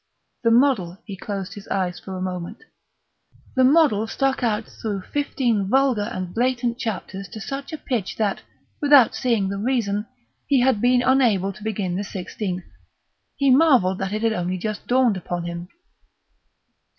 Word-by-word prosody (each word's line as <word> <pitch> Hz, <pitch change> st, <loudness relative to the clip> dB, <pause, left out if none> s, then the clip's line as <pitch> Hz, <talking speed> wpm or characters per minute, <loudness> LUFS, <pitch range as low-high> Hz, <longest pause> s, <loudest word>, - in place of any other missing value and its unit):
The 230 Hz, -, +3 dB
model 230 Hz, -8 st, +3 dB
(he 200 Hz, -, -6 dB
closed 195 Hz, 0 st, -5 dB
his 205 Hz, -1 st, -11 dB
eyes 180 Hz, -2 st, -1 dB
for 190 Hz, -1 st, -7 dB
a -, -, -5 dB
moment) 180 Hz, +2 st, -5 dB, 0.9 s
the 260 Hz, -, +4 dB
model 260 Hz, -6 st, +4 dB
stuck 270 Hz, +3 st, 0 dB
out 220 Hz, -2 st, 0 dB
through 205 Hz, -3 st, -5 dB
fifteen 240 Hz, -7 st, -1 dB
vulgar 255 Hz, -4 st, +2 dB
and 185 Hz, -1 st, -5 dB
blatant 245 Hz, 0 st, 0 dB
chapters 195 Hz, -3 st, -4 dB
to 220 Hz, -, -9 dB
such 275 Hz, +6 st, -5 dB
a 315 Hz, -, -4 dB
pitch 240 Hz, -10 st, -3 dB
that, 210 Hz, -3 st, -1 dB, 0.4 s
without 285 Hz, -4 st, +6 dB
seeing 230 Hz, -6 st, +1 dB
the 200 Hz, 0 st, -3 dB
reason, 215 Hz, -3 st, 0 dB, 0.4 s
he 275 Hz, -3 st, +3 dB
had 250 Hz, -5 st, +2 dB
been 245 Hz, 0 st, +4 dB
unable 235 Hz, -7 st, +3 dB
to 210 Hz, -, -13 dB
begin 195 Hz, -5 st, -2 dB
the 200 Hz, -, -2 dB
sixteenth. 185 Hz, -1 st, -5 dB, 0.7 s
He 275 Hz, -2 st, +3 dB
marvelled 255 Hz, -, +4 dB
that 195 Hz, 0 st, -2 dB
it 215 Hz, +1 st, -2 dB
had 225 Hz, -1 st, +2 dB
only 180 Hz, -1 st, -2 dB
just 215 Hz, +3 st, -5 dB
dawned 245 Hz, -5 st, +3 dB
upon 175 Hz, -1 st, -4 dB
him. 170 Hz, 0 st, -5 dB
215 Hz, 165 wpm, -23 LUFS, 190-255 Hz, 0.9 s, without